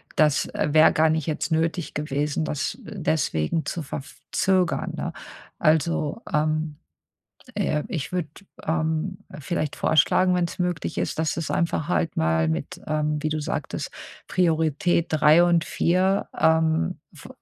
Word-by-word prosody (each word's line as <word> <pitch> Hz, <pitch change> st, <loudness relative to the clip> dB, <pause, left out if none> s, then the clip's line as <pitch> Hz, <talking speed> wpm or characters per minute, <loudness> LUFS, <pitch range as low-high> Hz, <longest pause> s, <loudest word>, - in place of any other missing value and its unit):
das 150 Hz, -2 st, +3 dB
wäre 155 Hz, +2 st, +5 dB
gar 160 Hz, 0 st, +4 dB
nicht 160 Hz, -2 st, -1 dB
jetzt 155 Hz, +2 st, -2 dB
nötig 165 Hz, +1 st, 0 dB
gewesen, 150 Hz, +1 st, -1 dB
das 150 Hz, +5 st, -2 dB
deswegen 160 Hz, -, -1 dB
zu 165 Hz, -, -3 dB
verf 135 Hz, 0 st, -7 dB, 0.2 s
zögern, 185 Hz, -2 st, +1 dB
ne? -, -, -3 dB, 0.5 s
Also, 160 Hz, +5 st, +1 dB
ähm, 155 Hz, 0 st, 0 dB, 0.8 s
äh, 155 Hz, -7 st, 0 dB
ich 160 Hz, 0 st, -4 dB
würde, 175 Hz, -4 st, -1 dB, 0.4 s
ähm, 160 Hz, +3 st, -1 dB, 0.2 s
vielleicht 155 Hz, -1 st, -2 dB
vorschlagen, 170 Hz, +4 st, +3 dB
wenn's 175 Hz, +1 st, -2 dB
möglich 175 Hz, -, -2 dB
ist, 90 Hz, -, -2 dB
dass 160 Hz, 0 st, 0 dB
du's 165 Hz, -1 st, -4 dB
einfach 170 Hz, -2 st, 0 dB
halt 170 Hz, -2 st, 0 dB
mal 80 Hz, 0 st, +2 dB
mit, 80 Hz, -, -3 dB
ähm, 150 Hz, 0 st, 0 dB
wie 155 Hz, -, -1 dB
du 155 Hz, 0 st, -1 dB
sagtest, 150 Hz, -, -4 dB, 0.4 s
Priorität 165 Hz, 0 st, +1 dB
3 155 Hz, +2 st, +5 dB
und 170 Hz, -1 st, +3 dB
4, 185 Hz, +3 st, +1 dB
ähm, 160 Hz, -, +2 dB
f -, -, -13 dB
160 Hz, 140 wpm, -24 LUFS, 150-170 Hz, 0.8 s, wäre